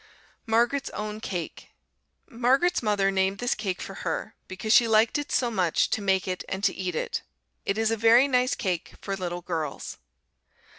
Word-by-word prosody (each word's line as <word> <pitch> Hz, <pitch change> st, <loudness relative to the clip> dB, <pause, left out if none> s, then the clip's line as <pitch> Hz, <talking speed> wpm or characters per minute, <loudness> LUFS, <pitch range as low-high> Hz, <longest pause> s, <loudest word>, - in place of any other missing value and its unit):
Margaret's 240 Hz, +5 st, +2 dB
Own 210 Hz, 0 st, -4 dB
Cake 180 Hz, -6 st, -5 dB, 0.6 s
Margaret's 265 Hz, +10 st, +2 dB
mother 205 Hz, -3 st, +2 dB
named 190 Hz, 0 st, +1 dB
this 245 Hz, +2 st, 0 dB
cake 195 Hz, -4 st, -3 dB
for -, -, -7 dB
her, -, -, -3 dB
because 195 Hz, +4 st, -1 dB
she 235 Hz, -, +6 dB
liked 220 Hz, +4 st, +3 dB
it 290 Hz, -, -6 dB
so 245 Hz, -2 st, +1 dB
much 180 Hz, -6 st, +1 dB
to 220 Hz, -, 0 dB
make 190 Hz, -2 st, +1 dB
it 185 Hz, -1 st, -3 dB
and 190 Hz, +1 st, -4 dB
to -, -, +3 dB
eat 185 Hz, -3 st, -4 dB
it. -, -, -2 dB, 0.5 s
It 200 Hz, -, 0 dB
is 225 Hz, 0 st, +1 dB
a 225 Hz, -, 0 dB
very 230 Hz, +5 st, +6 dB
nice 250 Hz, -1 st, +2 dB
cake 180 Hz, -4 st, -3 dB
for 195 Hz, -, -3 dB
little 175 Hz, -2 st, -4 dB
girls. 160 Hz, -5 st, -4 dB
210 Hz, 180 wpm, -26 LUFS, 190-235 Hz, 0.6 s, she